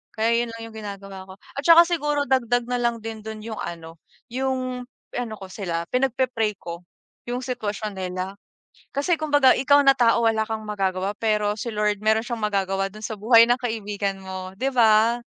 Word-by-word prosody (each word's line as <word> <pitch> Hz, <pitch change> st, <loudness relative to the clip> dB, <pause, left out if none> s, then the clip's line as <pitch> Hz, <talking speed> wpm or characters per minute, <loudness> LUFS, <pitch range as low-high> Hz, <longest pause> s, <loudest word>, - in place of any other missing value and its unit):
Kaya 230 Hz, +1 st, +2 dB
yun -, -, -9 dB
lang 230 Hz, -, -8 dB
yung -, -, -15 dB
ginagawa 195 Hz, -2 st, -8 dB
ko 190 Hz, -, -10 dB
at 280 Hz, -, -8 dB
saka 335 Hz, 0 st, +9 dB
siguro 295 Hz, -4 st, 0 dB
dagdag 245 Hz, -2 st, +2 dB
na 250 Hz, 0 st, -1 dB
lang 235 Hz, -1 st, 0 dB
din 225 Hz, -1 st, -6 dB
dun 220 Hz, 0 st, -6 dB
yung 220 Hz, -1 st, -6 dB
ano, 165 Hz, -1 st, -7 dB, 0.3 s
yung 255 Hz, 0 st, -2 dB, 0.3 s
ano 245 Hz, -3 st, -3 dB
ko 190 Hz, -, -8 dB
sila 170 Hz, -4 st, -3 dB
pinagpe-pray 250 Hz, -4 st, 0 dB
ko 170 Hz, 0 st, -8 dB, 0.5 s
yung 245 Hz, +1 st, -2 dB
sitwasyon 215 Hz, -4 st, -3 dB
nila. 185 Hz, +1 st, -4 dB, 0.6 s
Kasi 290 Hz, +5 st, +2 dB
kumbaga 290 Hz, -4 st, +4 dB
ikaw 285 Hz, +2 st, +5 dB
na 275 Hz, -, +7 dB
tao, 235 Hz, -1 st, +4 dB
wala 220 Hz, -1 st, +1 dB
kang 220 Hz, -1 st, -3 dB
magagawa 195 Hz, -1 st, -1 dB
pero 210 Hz, -2 st, +1 dB
si 235 Hz, -, -3 dB
Lord 210 Hz, -1 st, 0 dB
meron 220 Hz, 0 st, +4 dB
siyang 235 Hz, -2 st, -4 dB
magagawa 195 Hz, -1 st, 0 dB
dun 215 Hz, -, -11 dB
sa 220 Hz, -, -4 dB
buhay 230 Hz, +2 st, +7 dB
ng 245 Hz, -, +4 dB
kaibigan 205 Hz, -4 st, -3 dB
mo 185 Hz, 0 st, -7 dB
'di 270 Hz, -, +1 dB
ba? 230 Hz, 0 st, +4 dB
220 Hz, 185 wpm, -24 LUFS, 200-250 Hz, 0.6 s, saka